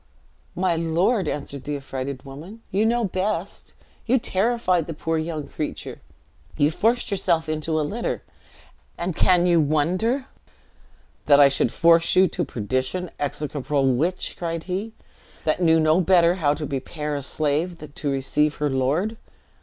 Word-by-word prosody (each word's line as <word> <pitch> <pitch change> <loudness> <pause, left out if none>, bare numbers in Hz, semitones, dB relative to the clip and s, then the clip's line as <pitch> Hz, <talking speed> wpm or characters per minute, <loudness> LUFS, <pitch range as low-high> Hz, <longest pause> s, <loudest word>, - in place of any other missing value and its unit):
"My 180 -2 +1
lord," 170 +5 +1
answered 140 -2 -4
the 145 +2 -3
affrighted 135 -1 -5
woman, 165 +12 -10
"you 210 +3 +2
know 240 +1 +1
best. 195 -1 -3 0.3
You 255 +3 +4
terrified 190 -6 +1
the 165 - -5
poor 165 +1 -1
young 155 -2 -4
creature. 150 - -6 0.6
You 145 +2 +3
forced 230 +7 +1
yourself 170 -4 +1
into 155 0 -1
a - - +1
litter, 230 +9 -3 0.7
and 175 -1 -3
can 180 0 +4
you 170 -2 +4
wonder 180 - +1 0.5
" - - -34
"That 145 -1 +7
I 140 -1 +8
should 135 -3 +1
force 165 0 +4
you 185 +1 +6
to 175 - -2
perdition! 130 - -2
execrable 145 -2 0
witch," 170 +9 -1
cried 165 -1 -3
he, 195 +5 -4 0.5
"that 155 +3 0
knew 165 -1 +5
no 155 +3 +3
better 175 -1 +4
how 150 -5 +1
to 150 0 -4
prepare 150 +2 -4
a 140 - -3
slave 155 +5 0 0.2
to 145 - -3
receive 140 +2 +1
her 150 -1 -1
lord!" 150 - 0
165 Hz, 155 wpm, -23 LUFS, 145-185 Hz, 0.7 s, I